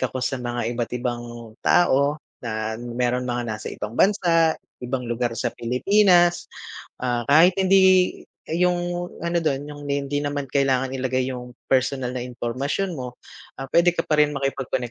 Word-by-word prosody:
ako 130 0 -2
sa 135 - -2
mga 120 -1 -2
iba't 120 -1 -3
ibang 120 -1 -3 0.4
tao, 145 -3 +3 0.3
na 110 -1 -3
meron 125 +1 -1
mga 120 0 -2
nasa 105 - -7
ibang 105 - -6
bansa, 165 -3 +3 0.3
ibang 125 +1 -3
lugar 120 0 -2
sa 120 - -2
Pilipinas, 175 - +3 0.6
ah, 120 -1 0
kahit 160 +6 +7
hindi 190 -1 +4 0.3
yung 175 +1 0 0.2
ano 170 0 0
dun, 145 -3 -2
yung 145 0 -9
ni 140 0 -1
hindi 140 +1 -2
naman 145 -2 -3
kailangan 135 -2 +1
ilagay 130 0 -1
yung 125 -1 -7 0.2
personal 130 -1 +1
na 125 -1 -4
impormasyon 130 +9 -2
mo, 125 -1 -6 0.5
ah, 135 - -4
pwede 175 +1 +4
ka 165 - 0
pa 150 - +1
rin 150 0 +4
makipag-konek 135 -3 -2
135 Hz, 155 wpm, -23 LUFS, 125-165 Hz, 0.6 s, kahit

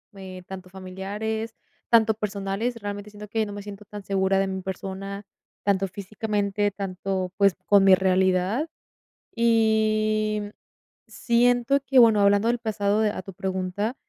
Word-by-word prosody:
eh, 190 -1 -9
tanto 185 -1 -9
familiares, 200 +4 -5 0.4
tanto 225 -2 +5
personales. 210 +2 -3
Realmente 205 0 -6
siento 210 0 -10
que 220 +1 -1
no 205 - -7
me 205 - -6
siento 205 0 -10
tan 205 0 -9
segura 195 0 +1
de 195 - +1
mi 190 0 -4
persona, 195 +1 -6 0.4
tanto 195 -1 +1
físicamente 205 +1 -2
tanto, 190 -1 -3
pues, 200 -2 +4
con 200 -1 +6
mi 190 -1 +7
realidad. 190 - +1 0.7
Y, 215 -2 +2
mm, 205 - -6 0.6
siento 245 +2 +2
que, 270 -1 +4
bueno, 225 -3 +6
hablando 200 +2 +4
del 240 +1 +2
pasado 210 -2 0
de 215 -1 +2
a - - -5
tu 195 +1 -10
pregunta, 190 +4 -3
205 Hz, 150 wpm, -25 LUFS, 190-220 Hz, 0.7 s, mi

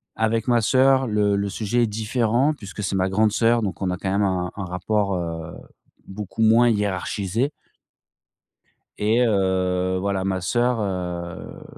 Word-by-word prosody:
Avec 110 +1 0
ma 120 -1 +3
sœur, 130 +3 +3
le 105 -2 +1
le 100 0 -1
sujet 110 +4 0
est 115 - +2
différent 115 +6 +1
puisque 105 -5 -8
c'est 95 - -1
ma 95 0 +1
grande 105 +2 +2
sœur 115 +1 +2
donc 100 -1 -4
on 95 - 0
a 90 - -2
quand 95 0 -3
même 100 - +1
un 90 -3 0
un 100 - -5
rapport, 100 +2 -1
heu, 85 -1 -5 0.5
beaucoup 105 +3 -4
moins 115 +2 +5
hiérarchisé. 105 +3 -1 1.5
Et 110 +3 +2
heu, 95 -3 +1
voilà, 95 0 -1
ma 95 -1 -1
sœur, 120 +6 0
heu, 90 -3 -5
100 Hz, 160 wpm, -23 LUFS, 95-115 Hz, 1.5 s, moins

